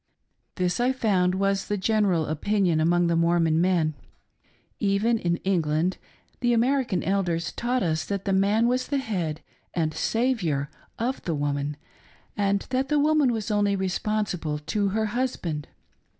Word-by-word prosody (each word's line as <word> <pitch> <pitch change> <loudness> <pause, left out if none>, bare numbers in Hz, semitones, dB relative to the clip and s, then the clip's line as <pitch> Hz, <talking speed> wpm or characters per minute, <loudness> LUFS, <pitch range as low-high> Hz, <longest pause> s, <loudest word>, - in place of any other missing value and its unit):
This, 180 +1 0
I 250 +2 +2
found, 185 -7 +1
was 195 0 0
the 205 - -1
general 195 -5 +2
opinion 175 +2 +1
among 175 +2 +3
the 170 0 +2
Mormon 165 -1 +3
men. 175 -4 +2 0.9
Even 210 +3 +2
in 170 -3 0
England, 170 -1 +1 0.4
the 240 -1 +2
American 240 -5 +1
Elders 175 -4 0
had - - -15
taught 245 +1 0
us 160 -3 0
that 200 -1 -3
the 195 - +1
man 205 +4 +3
was 255 +1 0
the 285 - 0
head 180 - -2 0.3
and 160 -3 0
"saviour" 185 - 0 0.3
of 250 +4 -2
the 165 - -1
woman, 145 0 -2 0.6
and 200 -1 +1
that 265 +1 0
the 300 - +2
woman 295 -2 +3
was 220 -2 -3
only 205 -1 +2
responsible 190 -4 -1
to 200 +7 -1
her 220 +3 0
husband. 180 - -2
195 Hz, 150 wpm, -25 LUFS, 170-225 Hz, 0.9 s, among